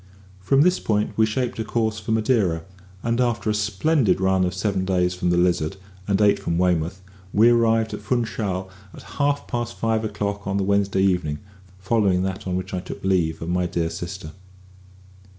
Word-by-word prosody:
From 95 +9 +3
this 180 +3 +3
point 105 -1 -1
we 110 0 +3
shaped 120 +1 -2
a - - 0
course 110 -1 -1
for 110 - -5
Madeira, 105 -7 +1 0.4
and 115 +1 +1
after 120 -3 0
a - - 0
splendid 105 +5 +1
run 95 0 +2
of 90 0 -2
seven 95 -1 -1
days 90 -1 +1
from 90 0 -1
the 85 - +2
Lizard 90 0 +1 0.3
and 100 -1 +1
eight 100 -1 +4
from 85 -4 -2
Weymouth 90 +1 0 0.3
we 115 +3 +5
arrived 115 -1 +2
at - - -5
Funchal 110 -6 -2 0.3
at - - -11 0.2
half 145 0 +1
past 120 -2 -3
five 115 -1 0
o'clock 100 -1 -3
on 100 +1 0
the 100 - +1
Wednesday 100 -1 +1
evening 90 -6 +1 0.4
following 95 -2 +1
that 95 0 -4
on 90 - -1
which 95 0 -4
I 90 - -1
took 90 - -8
leave 85 -4 +1
of 85 - -5
my 90 0 +1
dear 85 -1 -1
sister. 85 -2 -6
100 Hz, 185 wpm, -23 LUFS, 90-110 Hz, 0.4 s, we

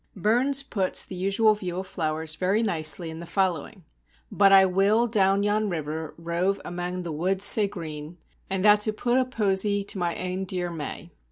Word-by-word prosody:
Burns 245 +8 +1
puts 195 -8 0
the - - -10
usual 195 +4 +2
view 185 -4 -6
of 190 - -4
flowers 160 -3 -2
very 190 +7 0
nicely 165 -3 +1
in 160 - -9
the 170 - -9
following: 185 +1 -2 0.5
"But 200 -1 +4
I 195 -1 +7
will 200 +5 +2
down 200 -3 +1
yon 210 +1 0
river 155 -2 -5
rove 170 +4 -1
amang 180 +1 -5
the 170 - -5
woods 185 +6 -1
sae 210 -1 +6
green, 160 -4 -8 0.3
and 190 +1 -2
a' 210 0 +7
to 215 +1 -1
pu' 240 +4 0
a 260 - +1
posie 205 -4 0
to 195 -1 -4
my 175 -1 -1
ain 185 +1 -4
dear 180 -1 -4
May." 155 -3 -7
190 Hz, 185 wpm, -25 LUFS, 170-205 Hz, 0.5 s, I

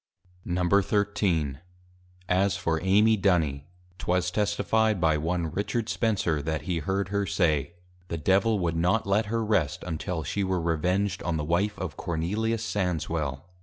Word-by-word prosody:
XIII. 90 -4 +1 0.7
As 95 +2 +2
for 80 -1 -1
Amy 105 +4 +4
Duny, 80 -8 +1 0.3
'twas 90 0 0
Testifi'd 105 +1 +1
by 80 -2 +3
one 80 +1 -1
Richard 105 +4 -2
Spencer 95 -9 0
that 80 0 -3
he 85 0 -1
heard 95 +4 -1
her 100 -1 -1
say, 80 -3 +1 0.4
_The 80 -2 -4
Devil 100 +3 +3
would 85 -3 -1
not 90 +6 +1
let 100 +2 +1
her 115 +1 -1
Rest; 95 -9 0
until 80 -1 -3
she 100 +8 -2
were 95 -1 0
Revenged 90 +4 0
on 80 -2 -1
the 75 - -2
Wife 100 +6 0
of 85 -6 -5
+Cornelius 105 +7 -1
Sandswel+. 80 -8 -2
90 Hz, 145 wpm, -27 LUFS, 80-100 Hz, 0.7 s, Amy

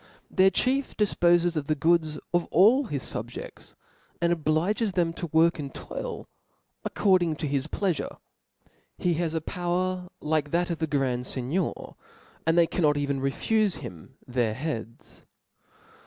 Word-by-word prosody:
Their 190 0 +5
C) - - +5
chief 270 +2 0
tefs. 210 -2 +1
20th 175 0 +5
difpofes 175 0 -1
of 145 -3 -2
the 155 - +2
goods 160 0 +2 0.2
of 175 -1 +2
all 230 - +5
his 145 - -3
fubj^ds, - - -6 0.4
and 170 0 +2
coiicaion. 160 - -14
QJjijges 190 - +1
them 170 -2 +1
to 170 - -5
work 165 +1 +3
and 140 -2 -5
toil^ - - -6 0.6
according 180 -5 +2
to 150 0 -3
his 140 +1 -1
plealure. 180 -3 -2 0.8
He 175 - +1
has 165 0 -1
a 160 - 0
power 180 +2 -2
like 150 -1 0
that 175 +3 0
of 165 - -3
tbe 160 -1 -1
grand 130 -4 0
Cgnior, 135 +9 -2 0.5
and 165 +1 +3
they 170 - +7
cannot 150 -3 +1
even 140 -1 -1
refufe 200 +9 +1
him 120 - -10
their 120 -3 0
heads. 115 -5 -6
165 Hz, 160 wpm, -27 LUFS, 145-180 Hz, 0.8 s, they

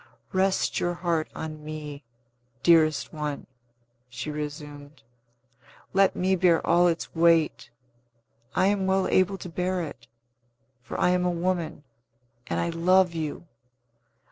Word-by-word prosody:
"Rest 190 0 +1
your 175 0 -1
heart 170 -3 -1
on 155 -1 -6
me, 150 -1 -7 0.6
dearest 160 -3 +4
one!" 150 -2 -4 0.6
she 125 +5 -5
resumed. 150 -2 -7 0.9
"Let 195 0 +4
me 190 +1 +1
bear 175 -2 +3
all 175 +1 +4
its 170 -1 -2
weight; 165 -1 +3 0.9
I - - +3
am 195 -1 +1
well 190 0 +2
able 185 +1 +2
to 185 - -8
bear 180 +1 -2
it; 125 -7 -9 0.7
for - - -6
I 180 - +3
am 180 0 +1
a 180 - +2
woman, 170 -3 -2 0.6
and - - -1
I 170 - 0
love 180 +2 +3
you! 160 0 -4
170 Hz, 130 wpm, -26 LUFS, 155-180 Hz, 0.9 s, dearest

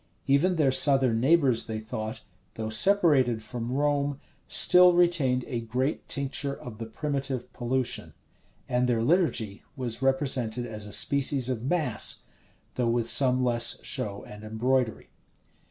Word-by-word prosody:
Even 150 +7 +2
their 150 -5 +2
southern 130 -4 +3
neighbors, 130 -4 +2
they 110 -1 -4
thought, 110 0 -6 0.3
though 110 -1 -5
separated 130 - +2
from 120 +1 -6
Rome, 145 0 -1 0.3
still 180 0 +6
retained 160 -8 +2
a 120 -4 -4
great 125 +6 -3
tincture 140 0 -1
of 115 -3 -10
the 115 - -6
primitive 135 0 -4
pollution; 125 +1 -2 0.5
and 125 0 0
their 115 -2 0
liturgy 120 - 0
was 125 -3 -5
represented 130 -3 -1
as 105 -3 -5
a - - -10
species 135 +1 +1
of 125 -4 -3
mass, 155 +5 -1 0.5
though 120 -2 -1
with 115 -1 0
some 125 +2 +3
less 120 -1 +3
show 100 -1 -3
and 105 0 -12
embroidery. 115 +2 -2
125 Hz, 140 wpm, -26 LUFS, 115-140 Hz, 0.5 s, still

